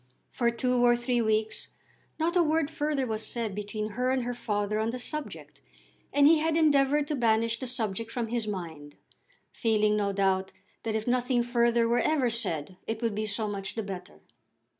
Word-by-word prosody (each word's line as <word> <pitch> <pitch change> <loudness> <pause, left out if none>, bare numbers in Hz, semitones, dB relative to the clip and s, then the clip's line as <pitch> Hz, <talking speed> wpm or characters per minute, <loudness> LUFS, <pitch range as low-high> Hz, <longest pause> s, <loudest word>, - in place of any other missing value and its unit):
For 235 -1 +1
two 245 +1 +1
or 240 0 +6
three 240 0 0
weeks 220 0 0 0.5
not 335 +3 0
a 355 - +5
word 315 -2 +1
further 295 -4 -1
was 220 -2 -3
said 225 -2 -3
between 210 +1 -4
her 250 +4 -1
and 260 -1 +1
her 245 +1 -2
father 210 -3 -1
on 220 +1 0
the 245 - -3
subject, 300 +4 -6 0.5
and 285 0 +4
he 315 +1 +6
had 320 +1 +1
endeavoured 290 -2 +3
to 300 - 0
banish 230 -2 +1
the 260 - -4
subject 230 -2 -3
from 235 -3 -3
his 235 -2 -1
mind, 160 -7 -6 0.6
feeling 215 -2 +2
no 205 -1 0
doubt 190 -1 0 0.3
that 220 -1 -2
if 220 0 -2
nothing 250 0 +1
further 235 -1 +2
were 240 +1 +2
ever 275 -6 +2
said 180 -6 -1
it 225 +1 -3
would 230 -2 +1
be 215 +1 -2
so 215 +1 0
much 195 -1 -4
the 225 - -2
better. 185 -2 -8
230 Hz, 190 wpm, -28 LUFS, 210-255 Hz, 0.6 s, or